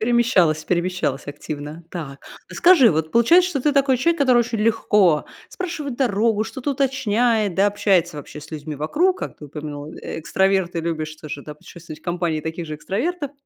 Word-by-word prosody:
Перемещалась, 215 -10 +2
перемещалась 175 -6 -1
активно. 150 +2 -7
Так. 145 -6 -7 0.3
А - - -11
скажи, 330 - +6
вот 160 0 -1
получается, 345 +11 +5
что 280 -6 -2
ты 295 +3 +2
такой 275 -2 +3
человек, 335 +5 +1
который 255 -3 +5
очень 235 -1 0
легко 210 -7 +3 0.2
спрашивает 310 -8 -5
дорогу, 220 -3 +1
что-то 250 +5 -4
уточняет, 235 -6 +1
да, 195 - +4
общается 195 -5 +1
вообще 150 +1 -9
с - - -13
людьми 150 -1 -6
вокруг. 340 - +1
Как - - -6
ты 150 - -11
упомянул, 150 +1 -7
экстраверт 190 +2 0
и - - 0
любишь 155 -2 -4
тоже, 150 -2 -7
да, 150 - -9
путешествовать 155 0 -12
в - - -32
компании 175 -3 -1
таких 160 +2 -5
же 155 -1 -5
экстравертов, 285 - -3
190 Hz, 175 wpm, -21 LUFS, 155-245 Hz, 0.3 s, скажи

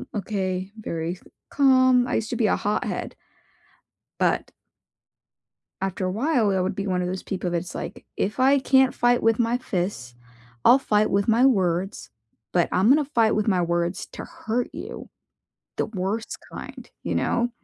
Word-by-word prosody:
okay, 190 -2 -2
very 170 -3 -4 0.3
calm. 255 -3 +4
I 250 - -1
used 220 0 -1
to - - -1
be 220 - +2
a - - +3
hothead. 205 +1 -2 1.1
But - - +1 1.3
after 190 0 -2
a - - -1
while, 235 - +1
I 190 -1 +1
would 185 +2 -1
be 200 0 -4
one 185 -1 0
of 180 - -2
those 185 +1 -4
people 185 -2 -3
that's 175 +1 -3
like, - - -6
"If 210 +5 -2
I 270 +2 +5
can't 265 -1 +3
fight 245 0 +2
with 225 -1 +3
my 235 +1 +1
fists, 175 - -3 0.5
I'll 255 - +7
fight 215 -5 +1
with 200 0 +1
my 235 +4 +5
words, 190 -5 0 0.4
but 175 -2 +2
I'm 190 +4 +3
gonna 295 +2 +5
fight 230 -6 +2
with 215 +1 0
my 180 -3 +3
words 170 +2 -1
to - - -7
hurt 235 +2 -3
you." - - -7 0.7
The - - 0
worst 210 +2 -3
kind, - - -9
you - - -2
know? 240 0 +1
210 Hz, 165 wpm, -24 LUFS, 185-245 Hz, 1.3 s, I'll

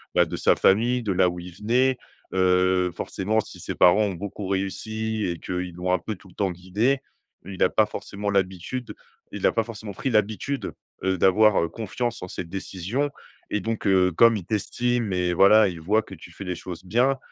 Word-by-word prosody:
bah, - - +5
de - - -5
sa - - +3
famille, 120 +5 +3
de 100 - 0
là 90 0 +3
où 90 - -6
il 90 0 -9
venait, 125 +6 +2 0.4
heu, 90 -1 +3
forcément 105 +5 -1
si - - -6
ses - - -5
parents 100 +5 +5
ont 100 - -1
beaucoup 100 +2 -6
réussi 110 +3 -2
et 85 -2 -3
qu'ils 90 -1 -4
l'ont 90 +1 -1
un 90 - +2
peu 110 +5 -5
tout 95 - -18
le 90 - -17
temps 100 -2 0
guidé. 105 +10 0 0.5
Il 95 0 -8
a - - +4
pas - - +3
forcément 100 +1 -5
l'habitude 100 +5 -2 0.4
il - - +1
a - - +3
pas 115 - +1
forcément 110 -2 -8
pris 130 +7 -3
l'habitude, 110 +6 -1 0.3
heu, 95 -1 +1
d'avoir, 100 +2 +4
heu, 85 - 0
confiance 115 +3 -4
en 90 - -5
ses 90 - -5
décisions 95 +9 -3 0.4
et 105 - -1
donc, 115 0 -3
heu, 90 -1 +4
comme 115 +5 +5
il 95 - -7
t'estime 115 +2 -1
et 90 -1 0
voilà, 100 +4 +6
il 85 -3 -8
voit 105 +6 +2
que - - -12
tu - - -12
fais - - -9
les 90 -1 -3
choses 90 0 -8
bien, 125 +7 +2
100 Hz, 210 wpm, -25 LUFS, 90-110 Hz, 0.5 s, voilà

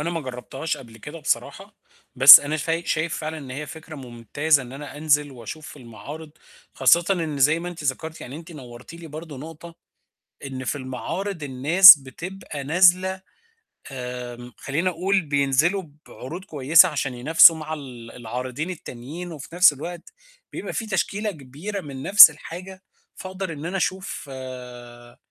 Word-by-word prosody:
أنا 170 +3 -3
ما 165 -1 -3
جرّبتهاش 130 +4 -6
قبل 115 -5 -14
كده 150 +8 -10
بصراحة، - - -3 0.4
بس 135 +2 +11
أنا 150 +2 -3
فاي 165 +3 -3
شايف 160 +1 -2
فعلًا 155 0 -6
إن 135 -3 -11
هي 145 +4 -6
فكرة 160 0 -11
مُمتازة 135 +4 -1
إن 125 - -11
أنا 145 +1 -10
أنزِل 150 -1 +1
وأشوف 130 +6 -10
المعارض، 145 +5 -11 0.4
خاصةً 170 +6 +4
إن 160 -5 -3
زي 150 +4 +3
ما 175 - -6
أنتِ 165 -4 -9
ذكرتي 160 +4 -4
يعني 130 +3 -9
أنتِ 170 +2 -12
نورتي 125 +2 -12
لي 170 -1 -11
برضه 155 -1 -10
نُقطة، 165 +3 -11 0.7
إن 130 -1 -7
في 130 - -3
المعارض 160 +8 -6
الناس 150 +6 +8
بتبقى 160 +2 -9
نازلة 185 +4 +3 0.7
آمم 125 -1 -8
خلّيني 155 +7 -2
أقول 185 +3 0
بينزلوا 145 +5 0 0.2
بعروض 175 +9 -9
كويسة 160 +3 +4
عشان 135 -4 -3
ينافسوا 160 +6 +6
مع 155 0 -7
ال 125 -6 -10
العارضين 125 +6 -6
التانيين، 165 +1 -9
وفي 155 +2 -10
نفْس 180 -3 +6
الوقت 170 +5 -9 0.4
بيبقى - - -6
في 225 - -4
تشكيلة 210 0 -2
كبيرة 160 +7 -8
من 135 -3 -9
نفْس 195 -4 +10
الحاجة، 185 +5 -11 0.3
فأقدر 185 -2 -7
إن 150 +1 -9
أنا 185 +3 -3
أشوف 190 -1 -4
آآ 125 -2 -11
150 Hz, 155 wpm, -22 LUFS, 130-170 Hz, 0.7 s, بس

